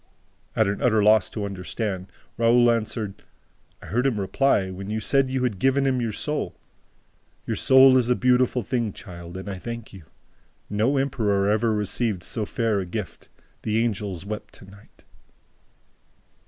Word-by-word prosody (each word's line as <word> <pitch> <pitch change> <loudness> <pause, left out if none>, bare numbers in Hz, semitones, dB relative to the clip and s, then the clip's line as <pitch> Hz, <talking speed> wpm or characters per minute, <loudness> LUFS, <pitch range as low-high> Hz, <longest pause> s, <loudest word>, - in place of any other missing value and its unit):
At 110 - +3
an 100 0 -2
utter 110 -4 +3
loss 105 -1 +5
to 105 -2 -4
understand, 95 0 -4 0.3
Raoul 120 +1 +4
answered: 110 -3 -3 0.6
"I - - -10
heard 125 +4 0
him 115 -6 0
reply, 100 -1 +1
when 95 +2 -7
you 110 +1 -1
said 135 +4 +2
you 130 -1 -1
had 110 -7 -1
given 135 +4 +2
him 130 -2 +1
your 115 -2 -1
soul, 150 +8 -2 0.9
'Your - - -2
soul 130 0 +7
is 125 -1 +2
a 125 - +4
beautiful 125 -1 +2
thing, 115 -2 -2
child, 85 -2 -10
and 95 - -8
I 95 -2 -5
thank 115 +1 -7
you. 95 -5 -12 0.7
No 110 +7 +1
emperor 105 -7 +1
ever 110 +2 +2
received 105 -2 -1
so 105 +3 -3
fair 115 -3 0
a 95 - -3
gift. 90 -3 -6 0.3
The 110 0 -1
angels 100 -6 -2
wept 105 +1 -7
tonight.'" 100 +2 -17
110 Hz, 160 wpm, -24 LUFS, 100-125 Hz, 0.9 s, soul